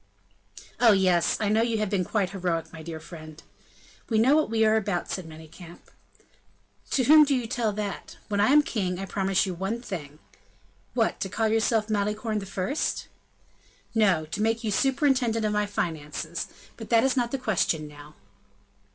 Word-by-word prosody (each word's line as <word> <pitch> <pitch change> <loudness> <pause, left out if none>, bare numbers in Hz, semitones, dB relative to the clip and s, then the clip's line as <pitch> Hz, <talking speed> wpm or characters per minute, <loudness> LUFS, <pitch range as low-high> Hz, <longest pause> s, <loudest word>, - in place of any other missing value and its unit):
"Oh! 230 -3 +6
yes, 185 -3 +2
I 215 - 0
know 215 +2 +3
you 230 -1 0
have 215 -2 -2
been 195 -3 +1
quite 190 0 -1
heroic, 175 -4 -2
my 160 - -9
dear 160 0 -7
friend." 155 -1 -11 0.7
"We 225 - +1
know 255 +7 +5
what 310 -5 +2
we 220 0 +2
are 215 0 +4
about," 200 -5 -1
said 185 -3 -4
Manicamp. 160 +2 -13 1.0
"To 260 - +1
whom 305 +4 +8
do 285 -2 +2
you 250 -2 -1
tell 225 -1 -1
that? 205 -1 -5
When 205 -1 -1
I 205 - +4
am 295 +2 +6
king, 185 -9 -2
I 195 - -4
promise 195 0 0
you 185 - -3
one 195 +7 -3
thing." 150 -9 -7 0.8
"What? 230 -3 +1
To 195 - -3
call 220 +3 0
yourself 220 -1 +1
Malicorne 215 +1 -1
the 195 - -8
First?" 200 +10 -2 0.8
"No; 195 -8 +3
to 165 +7 -5
make 225 +2 0
you 215 - -1
superintendent 255 -2 +1
of 210 - 0
my 210 0 +1
finances; 160 -3 -4 0.3
but 225 - -9
that 230 -1 +4
is 265 0 +2
not 240 -2 +1
the 270 - -2
question 180 -10 0
now." 150 0 -13
210 Hz, 180 wpm, -26 LUFS, 180-225 Hz, 1.0 s, whom